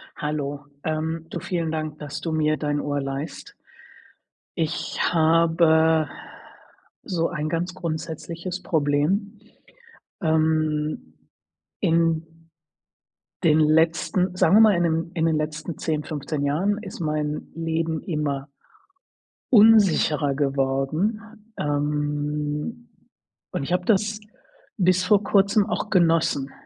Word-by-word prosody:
Hallo, 145 -1 -4 0.2
ähm, 160 +1 -3
du, - - -5
vielen 170 -3 -2
Dank, 155 -1 -4
dass 145 -1 -6
du 165 - -3
mir 155 -1 +1
dein 145 0 -1
Ohr 145 -1 -2
leihst. 135 - -6 1.0
Ich 165 0 -2
habe 160 -1 +3 0.9
so 170 -3 -1
ein 155 -3 -3
ganz 175 +3 -2
grundsätzliches 170 +1 -5
Problem. 165 +8 0 0.8
Ähm, 155 - 0 0.6
in 165 -1 +2 1.2
den 155 -2 +5
letzten 165 +4 +2
sagen 190 - +4
wir - - +8
mal, 215 -2 +7
in 175 - +1
den 165 0 0
in 165 -2 +1
den 160 -1 +2
letzten 155 +1 -4
10, 155 -2 -2
15 145 -1 -4
Jahren 185 +9 +1
ist 195 -4 -9
mein 150 -1 -2
Leben 165 -1 -2
immer 145 -4 -3 1.0
unsicherer 195 - +5
geworden, 140 +8 0 0.4
ähm, 150 +7 -2 0.6
und - - -3
ich 155 - -2
habe 180 0 +1
das 210 0 +1 0.6
bis 185 -2 +3
vor 200 +2 +3
Kurzem 200 +1 +3
auch 215 -1 -3
genossen. 165 -7 +2
160 Hz, 110 wpm, -24 LUFS, 150-175 Hz, 1.2 s, wir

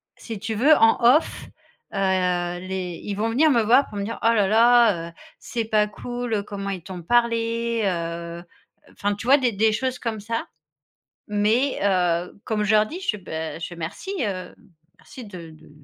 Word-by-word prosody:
si 225 -3 -7
tu 220 +2 -4
veux, 280 +9 +5
en 225 -3 +4 0.2
off, 320 - -6 0.5
heu, - - -4 0.6
les 185 -2 -5
ils 200 - -4
vont 220 +2 -1
venir 305 +6 +4
me 240 -4 +4
voir 250 +6 +4
pour 205 - -8
me 200 - -2
dire: 225 +3 -5
«Oh - - +4
là 205 -3 +2
là, 225 -5 +4
heu, - - -17 0.3
c'est 230 -2 -4
pas 215 -1 +2
cool. 240 -1 -4
Comment 200 -1 -5
ils 185 -4 -5
t'ont 185 -2 -8
parlé 230 +2 +1
heu», 170 -2 -3
heu, - - -15 0.5
enfin, 205 0 -2
tu 210 - -9
vois, 280 +2 +7
des 250 -3 +1
des 220 +2 +3
choses 255 +3 -2
comme 225 -2 -3
ça. 230 +3 -3 0.8
Mais 215 +6 +1
heu, 180 -1 0
comme 215 -2 -1
je 210 - +1
leur 215 0 +5
dis, 340 +11 -7
je - - -4
fais: 210 - -7
«Beh», 160 -3 -5
je - - -3
fais: 175 - -10
«Merci, 170 - -6
heu, 190 -5 -3 0.5
merci 260 -5 -11
de 180 -5 -10
de 155 - -17
210 Hz, 195 wpm, -23 LUFS, 190-235 Hz, 0.8 s, vois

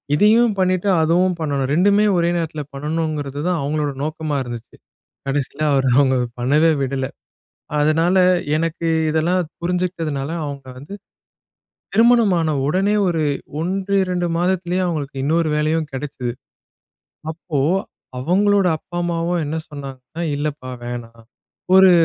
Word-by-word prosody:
இதையும் 220 +6 +4
பண்ணிட்டு, 185 +1 +1
அதுவும் 175 +3 +2
பண்ணணும். 140 -4 -1
2மே 200 +5 +4
ஒரே 170 0 +2
நேரத்தில 155 -2 -3
பண்ணணுங்கிறது 150 -1 -3
தான் 180 -3 +1
அவுங்களோட 150 +1 -1
நோக்கமா 155 -1 -3
இருந்துச்சு. 120 -2 -8 0.5
கடைசியில 140 +1 -2
அவரு 135 -1 +2
அவங்கள 130 -2 +4 0.2
பண்ணவே 150 +6 +3
விடல. 135 0 -1 0.7
அதனால 165 +5 +3 0.4
எனக்கு 165 +1 -2 0.2
இதெல்லாம் 170 +4 +1 0.2
புரிஞ்சுகிட்டதுனால, 170 -5 -2 0.2
அவுங்கள 140 -2 -7
வந்து 145 +9 -10 1.0
திருமணம் 230 -4 +5
ஆன 155 -2 0
உடனே 195 +7 +2
ஒரு 160 -3 0 0.4
1, 195 +3 -1
2 180 -1 -1
மாதத்திலேயே 180 0 0
அவங்களுக்கு 140 -5 -3
இன்னொரு 165 +2 +2
வேலையும் 155 +1 0
கெடைச்சது. 130 -3 -4 1.0
அப்போ 160 -3 -4 0.6
அவங்களுடைய 190 +4 +3
அப்பா, 175 +3 -9
அம்மாவும் 170 0 -1
என்ன 155 +3 -2
சொன்னாங்கன்னா, 140 +2 -8
"இல்லப்பா 145 -3 -4
வேணாம். 115 -1 -7 0.5
ஒரு 190 -1 +8
160 Hz, 115 wpm, -20 LUFS, 140-180 Hz, 1.0 s, ஒரு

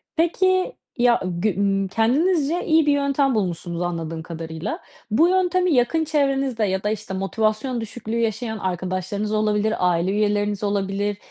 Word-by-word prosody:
Peki, 370 +6 +2 0.2
ya 240 -1 +4 0.2
gü 200 -2 +1
ımm, 195 -1 +1
kendinizce 295 - +1
iyi 320 -1 +4
bir 295 - +3
yöntem 280 -2 +1
bulmuşsunuz 175 -3 -2
anladığım 165 -2 -3
kadarıyla. 165 - -5 0.3
Bu 320 +10 +5
yöntemi 365 -2 +2
yakın 265 +6 +2
çevrenizde 275 -6 0
ya 190 0 -1
da 210 - 0
işte 210 -2 -4
motivasyon 215 +5 -1
düşüklüğü 225 +1 -5
yaşayan 220 0 -1
arkadaşlarınız 185 +3 -3
olabilir, 215 0 +1
aile 180 +1 +2
üyeleriniz 205 0 0
olabilir, 200 0 -1
215 Hz, 140 wpm, -22 LUFS, 195-275 Hz, 0.3 s, Bu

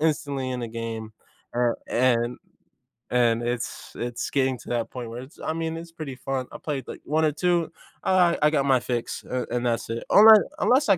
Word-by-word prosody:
instantly 145 -4 0
in 125 -1 -3
the 120 - -4
game, 115 -1 -5 0.4
a 120 -1 +2 0.2
and 120 -1 +2 0.7
and 120 -1 +3
it's 120 0 -4
it's 120 0 -3
getting 130 -2 +1
to - - -12
that 120 -2 -1
point 120 -3 -6
where 120 +2 -6
it's 135 - -16
I 160 - -1
mean, 165 0 -3
it's 165 0 -9
pretty 155 -6 -6
fun, 130 -2 -3
I - - -7
played, 140 -5 -4
like, - - -8
1 155 +2 +1
or 155 - +3
2, 170 0 +1 0.3
alright, 180 -2 +4
I 150 - +6
got 140 -3 +2
my 130 -2 +4
fix, 120 -2 -3
uh, 125 0 -2
and 120 0 -1
that's 115 -1 -1
it, 115 - -3
unless 215 +1 +9 0.2
unless 255 -1 +3
I 195 - +6
130 Hz, 210 wpm, -25 LUFS, 120-160 Hz, 0.7 s, unless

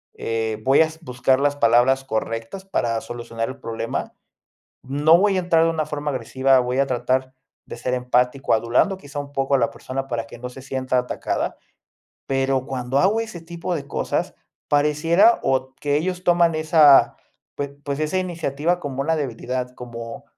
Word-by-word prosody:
eh, 110 -1 -2
voy 135 +5 +5
as 160 0 0
buscar 130 -2 +1
las 145 0 +1
palabras 125 +1 +3
correctas 115 - -4
para 115 -12 -1
solucionar 115 -1 -5
el 135 - -9
problema. 115 -2 -4 0.7
No 145 +5 +4
voy 200 +1 +2
a - - +2
entrar 170 -2 +3
de - - +3
una 160 -2 -1
forma 150 -1 -3
agresiva, 130 +1 +2
voy 125 +1 -1
a 140 - +3
tratar 130 +1 -1 0.3
de - - -8
ser 125 +2 -2
empático, 125 +1 +1
adulando 120 - +2
quizá 145 -5 -7
un 145 0 -7
poco 135 0 -1
a - - +4
la 120 -3 +1
persona 135 +1 -5
para 120 -3 -3
que 115 - -12
no 125 +1 -6
se 130 - -11
sienta 130 -1 -2
atacada. 125 0 -2 0.7
Pero 135 -1 0
cuando 130 0 -2
hago 200 +8 +3
ese 215 -6 -6
tipo 170 +2 -5
de 145 -3 -4
cosas, 140 - -2 0.3
pareciera 155 +9 +4
o 130 0 0
que 145 0 0
ellos 180 +3 -2
toman 170 -1 +4
esa, 155 -3 +5 0.4
pue 145 - -2 0.2
pues, 140 -1 -3
esa 155 +4 -1
iniciativa 170 -2 -1
como 135 -4 -4
una 160 +3 0
debilidad, 125 -2 -4
como 115 -1 -8
135 Hz, 175 wpm, -22 LUFS, 125-155 Hz, 0.7 s, voy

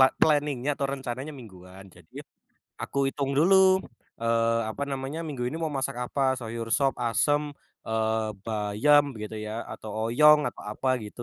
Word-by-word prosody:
pla 130 - +9
planning-nya 145 -3 +2
atau 140 - -1
rencananya 135 +2 -5
mingguan, 95 -6 -13
jadi 90 -3 -13 0.6
aku 140 -1 0
hitung 140 0 -2
dulu, 190 +2 +5 0.4
eee, 115 0 +2
apa 140 - -5
namanya, 135 +3 -4
minggu 135 -6 -4
ini 155 - -5
mau 160 -2 -3
masak 135 -1 -2
apa, 130 +1 0
sayur 115 -2 -5
sop, 135 -1 +2
asem, 145 +5 +2 0.5
eee, 110 0 0 0.2
bayam 110 +7 +3
gitu 105 +1 -6
ya, 110 +2 -4
atau 110 - -8 0.2
oyong 150 +3 +6
atau - - -11
apa 130 +4 -3
gitu, 105 +3 -8
130 Hz, 155 wpm, -27 LUFS, 110-145 Hz, 0.6 s, pla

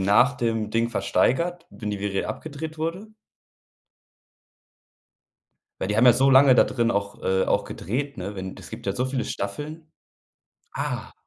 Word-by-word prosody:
nach 105 +8 +4
dem 115 -2 -1
Ding 115 +1 +1
versteigert, 130 - 0
wenn 105 -2 -6
die 100 -1 -4
Serie 100 -1 -1
abgedreht 155 +7 -6
wurde? 170 +7 -3 2.7
Weil - - -2
die 105 - 0
haben 115 - +5
ja 125 - +9
so 135 +3 +3
lange 135 0 +7
da - - +6
drin 120 -2 0
auch 100 -2 -2
äh, 95 0 +2
auch - - +1
gedreht, 140 - -4
ne? 95 +3 -5
Wenn 95 0 -5
es - - -11
gibt - - -9
ja 100 - 0
so 125 +3 -1
viele 130 -2 -2
Staffeln. 155 +10 -5 0.8
Ah. - - -3
120 Hz, 160 wpm, -25 LUFS, 100-145 Hz, 2.7 s, ja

